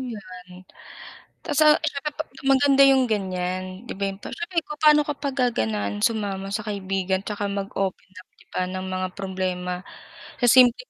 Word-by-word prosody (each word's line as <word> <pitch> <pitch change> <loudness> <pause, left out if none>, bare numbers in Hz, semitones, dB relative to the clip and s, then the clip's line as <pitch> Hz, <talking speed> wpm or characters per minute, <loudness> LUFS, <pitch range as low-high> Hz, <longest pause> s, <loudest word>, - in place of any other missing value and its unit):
'yan. 185 -6 -9 0.8
Asa 300 +1 +5
isa 300 -3 -2
sa 300 - -2
pa 310 - -3 0.2
maganda 275 0 +5
yung 265 -1 +5
ganyan. 185 -2 -3
'Di - - -5
ba 200 0 -1
yung 195 - -9
siyempre 340 - -5
papa'no 300 0 +4
ka 295 - -2
pa 280 0 -3
gaganahan 110 - -1
sumama 200 -3 -1
sa 215 +1 -3
kaibigan 195 -2 -1
'tsaka 205 0 -3
mag-open 195 0 -3
up 185 - -14
'di - - -24
ba, - - -1
ng 185 +1 -5
mga 185 0 -2
problema, 185 -1 -3 0.6
eh 245 - +4
simpleng 255 - +6
200 Hz, 160 wpm, -24 LUFS, 185-265 Hz, 0.8 s, simpleng